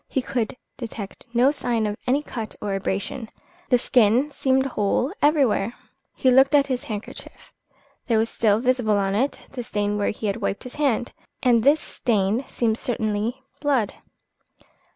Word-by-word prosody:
He 265 - -1
could 245 -1 -2 0.2
detect 225 -1 -7
no 245 +4 +4
sign 240 -6 -1
of 205 -1 -1
any 275 +4 +2
cut 225 -7 -6
or 205 - -3
abrasion, 200 +4 -3 0.4
the 250 - +5
skin 245 +3 +3
seemed 265 -1 +1
whole 250 - 0
everywhere. 265 -7 +2 0.4
He 260 - +3
looked 270 +3 +5
at 280 -1 +5
his 255 -3 -3
handkerchief. 210 -1 -8 0.5
There 230 -4 +3
was 220 +1 +2
still 215 -2 +3
visible 245 -4 +2
on 195 -1 0
it 260 +8 0
the 255 - -5
stain 205 -2 -1
where 205 - +1
he 215 - -5
had 200 0 0
wiped 200 -2 -2
his 250 - -9
hand, 250 -4 +1 0.3
and 240 -2 +4
this 290 +6 +4
stain 215 +1 0
seemed 225 -2 0
certainly 225 +1 -2 0.2
blood. 275 -7 +1
235 Hz, 160 wpm, -24 LUFS, 210-265 Hz, 0.5 s, the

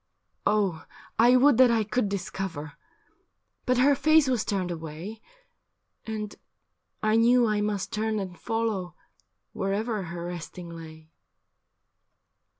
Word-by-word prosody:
' - - -49
Oh, 200 -6 +1 0.4
I 240 +2 +7
would 260 0 +5
that 255 -1 +7
I 230 -2 +2
could 215 0 0
discover. 190 -6 -4 0.9
But 255 0 +3
her 275 +3 +5
face 310 +1 +4
was 250 -4 +1
turned 185 -3 -2
away. 165 +6 -7 0.9
And 215 -1 -4 0.7
I 215 0 +3
knew 240 +1 +5
I 210 -2 +1
must 205 -2 -2
turn 220 0 0
and 190 -3 -4
follow 215 -5 -2 0.6
Wherever 210 +3 -1
her 170 0 -6
resting 175 0 -7
lay.' 160 -1 -11
210 Hz, 125 wpm, -27 LUFS, 175-230 Hz, 0.9 s, I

